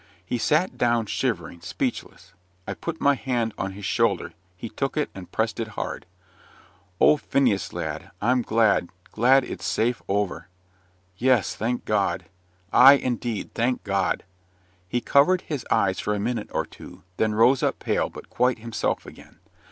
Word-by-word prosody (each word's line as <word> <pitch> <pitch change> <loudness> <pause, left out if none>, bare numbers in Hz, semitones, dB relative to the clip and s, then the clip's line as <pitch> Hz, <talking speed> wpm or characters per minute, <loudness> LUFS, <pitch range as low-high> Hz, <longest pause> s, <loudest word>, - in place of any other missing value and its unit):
He 120 +6 -2
sat 155 +8 +1
down, 120 -2 +2
shivering, 85 -4 -2
speechless. - - -4 0.3
I - - -2
put 165 -1 -5
my 140 - +4
hand 120 -5 -1
on 95 0 -4
his 100 0 -8
shoulder; - - +1 0.2
he 115 - -6
took 135 +7 -3
it 150 - 0
and 95 -2 -10
pressed 110 0 -1
it 110 -2 -5
hard. - - -4 0.9
"Oh! 150 - +6
Phineas, 125 -9 +1
lad, - - -5
I'm 125 +3 +2
glad; 110 -6 +2 0.2
glad 130 +4 +4
it's - - -7
safe 115 +2 0
over." 100 -1 -1 0.7
"Yes, 125 -4 +2
thank 120 +3 -2
God!" 100 -4 0 0.5
"Ay, 135 +2 +9
indeed; 120 -5 -2
thank 125 +2 0
God!" 100 -2 0 0.7
He 120 +4 0
covered 175 +9 +4
his 145 -6 -5
eyes 95 -1 +2
for 105 - -1
a - - -2
minute 115 +1 -2
or - - -1
two, - - -13
then 110 -1 +1
rose 120 +4 +4
up - - 0
pale, - - -1
but - - -11
quite 125 -1 +1
himself 115 0 -2
again. - - -14
115 Hz, 160 wpm, -25 LUFS, 105-130 Hz, 0.9 s, Ay